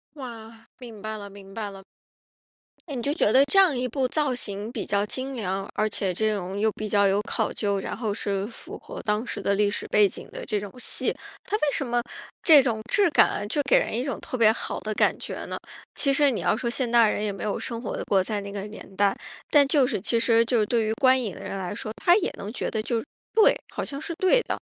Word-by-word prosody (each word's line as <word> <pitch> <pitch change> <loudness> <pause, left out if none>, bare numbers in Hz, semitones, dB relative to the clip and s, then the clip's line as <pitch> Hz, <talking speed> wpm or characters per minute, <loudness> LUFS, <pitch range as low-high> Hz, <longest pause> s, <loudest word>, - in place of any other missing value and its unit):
哇， 230 -4 -10
明 230 -5 -10
白 215 0 -4
了， 205 - -8
明 195 -1 -13
白 215 -2 -3
了。 195 0 -11 1.1
你 270 -5 -4
就 280 +5 0
觉 220 -9 +2
得 270 +3 +6
这 285 - 0
样 375 -7 +6
一 250 0 -1
部 260 +2 -1
造 290 -5 +1
型 205 -2 -4
比 235 -4 -4
较 205 0 +1
精 260 +5 -4
良， 195 -3 -3
而 215 - +1
且 195 -3 -1
这 215 +3 +1
种 190 +1 -4
又 220 - +3
比 215 0 -5
较 200 -1 +4
有 195 +1 +2
考 210 - -2
究， 200 -2 -1
然 - - -4
后 220 -4 -2
是 200 -2 -2
符 230 - -9
合 - - -9
当 210 +2 -1
时 - - -5
的 200 - +1
历 205 0 +3
史 - - -4
背 210 -1 +5
景 - - -9
的 - - -7
这 210 - -1
种 205 - -7
戏， 250 - 0 0.3
它 425 - -1
为 - - -2
什 275 - -2
么 240 0 +1 0.4
这 - - -10 0.2
种 220 -1 -5
质 400 +2 +4
感 205 - +3
就 290 - +1
给 280 - +4
人 - - 0
一 245 - 0
种 275 - -2
特 255 - -5
别 220 -2 +6
好 225 - -4
的 215 0 -4
感 - - +2
觉 - - -6
呢？ - - -5 0.4
其 275 -2 +2
实 285 -1 +4
你 230 - -2
要 - - +2
说 235 - -2
现 245 0 0
代 230 -2 +5
人 210 - -2
也 210 - 0
没 195 - -7
有 210 - -1
生 230 -1 -4
活 225 - -4
过， 190 -2 +3
在 210 +1 -2
那 200 0 -7
个 200 0 -5
年 210 -2 -10
代， 200 0 +2 0.3
但 285 -2 +5
就 280 -3 +4
是 225 -6 -1
其 230 +4 0
实 230 0 +4
就 230 0 +2
是 - - +2
对 225 0 +1
于 220 - 0
观 260 +2 +4
影 210 -7 -4
的 - - -10
人 195 - -5
来 185 +2 -4
说， 215 - -5
他 350 - +5
也 395 -1 0
能 205 - -6
觉 - - -3
得 220 - -1
就 230 0 -2 0.3
对， 440 - +6 0.2
好 - - -3
像 280 0 -5
是 335 +2 -5
对 375 +8 +3
的。 - - -3
220 Hz, 275 characters per minute, -25 LUFS, 205-255 Hz, 1.1 s, 得